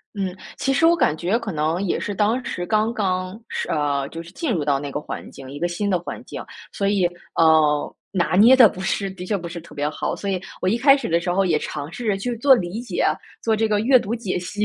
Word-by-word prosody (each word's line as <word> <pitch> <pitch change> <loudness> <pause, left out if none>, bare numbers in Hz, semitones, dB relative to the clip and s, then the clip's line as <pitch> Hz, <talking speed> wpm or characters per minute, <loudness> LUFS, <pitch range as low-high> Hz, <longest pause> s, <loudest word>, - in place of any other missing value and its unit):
嗯， 190 -3 -3 0.2
其 270 - 0
实 325 +4 +4
我 340 - +5
感 155 - +2
觉 180 +8 0
可 230 -4 -5
能 160 +2 -1
也 195 - 0
是 205 - -4
当 220 +6 +1
时 175 - -4
刚 215 +3 +1
刚 185 -2 -2
是， - - -4
呃， 145 -2 0
就 165 0 -7
是 170 - -13
进 305 - -2
入 165 -9 -1
到 140 -2 +2
那 140 0 -5
个 145 - -2
环 - - -7
境， 135 -1 -11
一 145 - -7
个 175 - 0
新 175 +4 -2
的 185 -3 +1
环 175 - -7
境， - - -7 0.7
所 175 - -20
以， - - -22
呃， 155 -2 +3 0.2
拿 180 -2 +1
捏 230 +7 +8
得 250 -3 +9
不 185 - -2
是 195 +1 -1
的 185 -1 -8
确 205 - 0
不 175 -3 -6
是 170 0 -6
特 160 -2 -15
别 145 0 -1
好。 150 - -3
所 200 - -3
以 185 -2 -1 0.2
我 185 - +2
一 225 +5 +1
开 275 +2 +6
始 270 -9 -4
的 170 +1 +3
时 175 +1 -2
候 195 +2 +2
也 165 -4 +2
尝 150 +1 -6
试 240 +6 -6
着 205 -2 +2
去 240 +5 -3
做 270 +3 +6
理 185 -1 -3
解， 240 - -2 0.4
做 225 - +2
这 220 +1 +1
个 210 -1 +2
阅 255 +4 +5
读 220 +2 -3
解 210 -7 -2
析， 205 +4 -3
185 Hz, 285 characters per minute, -22 LUFS, 165-220 Hz, 0.7 s, 得